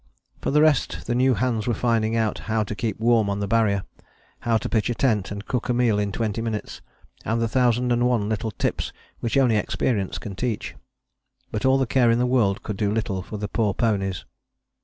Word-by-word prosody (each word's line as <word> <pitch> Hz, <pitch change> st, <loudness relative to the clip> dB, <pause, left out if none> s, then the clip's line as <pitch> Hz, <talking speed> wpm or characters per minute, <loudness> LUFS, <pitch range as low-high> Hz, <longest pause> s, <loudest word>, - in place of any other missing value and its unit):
For -, -, -1 dB
the 150 Hz, +2 st, +4 dB
rest 155 Hz, -4 st, +1 dB
the 120 Hz, -, -1 dB
new 130 Hz, +1 st, +3 dB
hands 115 Hz, 0 st, -1 dB
were 120 Hz, -, +1 dB
finding 115 Hz, -2 st, +1 dB
out 110 Hz, -2 st, 0 dB
how 110 Hz, 0 st, +2 dB
to 105 Hz, -, -5 dB
keep 105 Hz, -1 st, -3 dB
warm 115 Hz, -2 st, +3 dB
on 100 Hz, 0 st, -1 dB
the 100 Hz, -, -2 dB
Barrier, 105 Hz, -3 st, +2 dB, 0.6 s
how 115 Hz, -1 st, +1 dB
to -, -, -4 dB
pitch 110 Hz, -1 st, 0 dB
a 120 Hz, -, -1 dB
tent 110 Hz, -7 st, +1 dB
and 100 Hz, +1 st, -6 dB
cook 125 Hz, -2 st, -2 dB
a 120 Hz, -, +2 dB
meal 120 Hz, -4 st, +2 dB
in 100 Hz, -1 st, -1 dB
twenty 110 Hz, +1 st, -2 dB
minutes, 110 Hz, -2 st, -4 dB, 0.4 s
and 115 Hz, +1 st, 0 dB
the 115 Hz, -, +1 dB
thousand 125 Hz, 0 st, +2 dB
and 120 Hz, +1 st, +3 dB
one 115 Hz, -5 st, +1 dB
little 110 Hz, +1 st, -2 dB
tips 100 Hz, -, -2 dB, 0.3 s
which 115 Hz, +3 st, -1 dB
only 125 Hz, -5 st, +4 dB
experience 100 Hz, -4 st, -1 dB
can 95 Hz, +4 st, -7 dB
teach. 115 Hz, +1 st, -3 dB, 0.8 s
But 105 Hz, -, -2 dB
all 130 Hz, 0 st, +5 dB
the 135 Hz, -, +1 dB
care 120 Hz, 0 st, +3 dB
in 115 Hz, -, +4 dB
the 125 Hz, -, +2 dB
world 120 Hz, -4 st, +1 dB
could 105 Hz, -3 st, -4 dB
do 100 Hz, 0 st, 0 dB
little 105 Hz, -4 st, -1 dB
for 105 Hz, +4 st, -7 dB
the 105 Hz, 0 st, -3 dB
poor 105 Hz, -3 st, 0 dB
ponies. 100 Hz, -5 st, 0 dB
115 Hz, 220 wpm, -24 LUFS, 105-120 Hz, 0.8 s, all